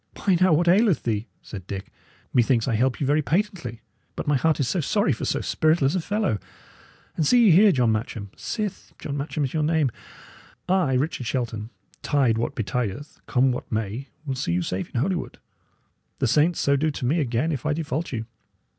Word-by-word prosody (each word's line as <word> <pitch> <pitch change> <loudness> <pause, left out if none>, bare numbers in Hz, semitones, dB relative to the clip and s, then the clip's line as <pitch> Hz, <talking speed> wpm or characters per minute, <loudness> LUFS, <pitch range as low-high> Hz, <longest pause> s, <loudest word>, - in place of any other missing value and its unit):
"Why, 195 -3 +2
now, 185 -1 +5
what 165 +3 +3
aileth 195 0 +4
thee?" 110 0 -1 0.2
said 95 -4 -9
Dick. 95 -1 -6 0.4
"Methinks 120 -1 +3
I 125 - +1
help 125 +4 +1
you 140 - 0
very 145 +3 +3
patently. 170 - -2 0.3
But - - -4
my 145 - +2
heart 155 +4 +2
is 135 - +1
sorry 170 +3 +1
for 110 - -4
so - - 0
spiritless 155 -3 +2
a 185 - 0
fellow! 200 - -1 0.8
And 160 - 0
see 240 +11 +5
ye 200 - +7
here, 200 +5 +7
John 125 -8 +2
Matcham 110 -2 -3
sith 210 -4 -5
John 140 - -5
Matcham 145 +1 -2
is 135 - -2
your 155 - 0
name 155 -4 +2 0.8
I, 180 -7 +2
Richard 130 -2 -1
Shelton, 115 -3 -3 0.3
tide 130 -6 +2
what 115 - -2
betideth, 120 +5 -3
come 130 0 +3
what 125 - -6
may, 110 +4 -3 0.2
will 135 - -2
see 125 -9 -2
you 90 0 0
safe 90 +2 -3
in 120 - -2
Holywood. 175 +6 -2 0.8
The - - 0
saints 155 +8 +3
so 140 - +3
do 155 +3 +1
to 140 -3 -4
me 155 +8 +2
again 130 +3 0
if 140 -5 -3
I 150 - +2
default 155 +1 -3
you. 115 -3 -3
140 Hz, 195 wpm, -24 LUFS, 120-165 Hz, 0.8 s, ye